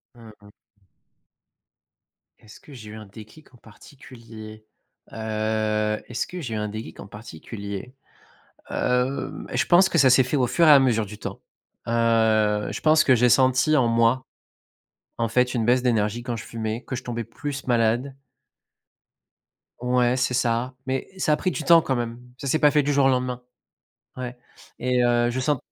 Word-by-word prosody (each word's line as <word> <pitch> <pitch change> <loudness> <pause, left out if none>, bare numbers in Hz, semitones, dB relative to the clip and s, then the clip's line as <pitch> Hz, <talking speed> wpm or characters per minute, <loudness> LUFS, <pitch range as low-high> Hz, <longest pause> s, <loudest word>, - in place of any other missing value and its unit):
Mmh 115 -2 -14
mh. 105 - -16 1.9
Est-ce 110 -1 -16
que 145 - -16
j'ai 110 -4 -10
eu 110 - -9
un 110 -2 -10
déclic 110 +9 -15
en - - -17
particulier? 115 -2 -13 0.5
Heu, 110 -1 -1
est-ce 120 - -3
que 180 - -7
j'ai 120 -7 -5
eu - - -2
un 105 0 -2
déclic 110 +2 -8
en 95 - -9
particulier? 100 +2 -8 0.8
Hem, 125 +2 -1
je - - +1
pense 185 +2 +5
que - - 0
ça 135 -4 +6
s'est 130 +1 +5
fait 130 +4 -1
au 125 - +2
fur 165 +7 +2
et - - +9
à 140 - +8
mesure 115 -5 +1
du 105 +1 -10
temps. - - -7 0.5
Heu, 110 -2 +2
je - - -6
pense 155 0 +4
que 130 - +4
j'ai 125 +1 +3
senti 130 +5 +3
en 120 -3 +3
moi, 115 +3 +2 0.9
en 115 - 0
fait, 125 +3 +1
une 115 -3 0
baisse 125 +2 +3
d'énergie 115 -2 0
quand 120 -1 -4
je 110 - -8
fumais, 110 +1 -4
que - - -6
je - - -6
tombais 120 -1 -4
plus 140 +5 -7
malade. 120 +2 +1 1.7
Ouais, 125 0 +1
c'est 125 0 0
ça. 120 +1 0
Mais, 130 0 -2
ça 155 -4 +1
a - - +1
pris 185 - -1
du 155 - -4
temps, 165 +2 +6
quand 135 - -1
même. 120 -1 -4 0.2
Ça 140 - -6
s'est 135 - +2
pas 150 -1 +5
fait 150 - +3
du 145 - 0
jour 140 -1 +3
au - - +5
lendemain. 125 -1 -1 0.7
Ouais 125 -1 -6 0.4
et, 125 0 +1
heu, 120 0 +2
je 125 +2 -3
sent 145 +2 +1
120 Hz, 180 wpm, -24 LUFS, 110-130 Hz, 1.9 s, et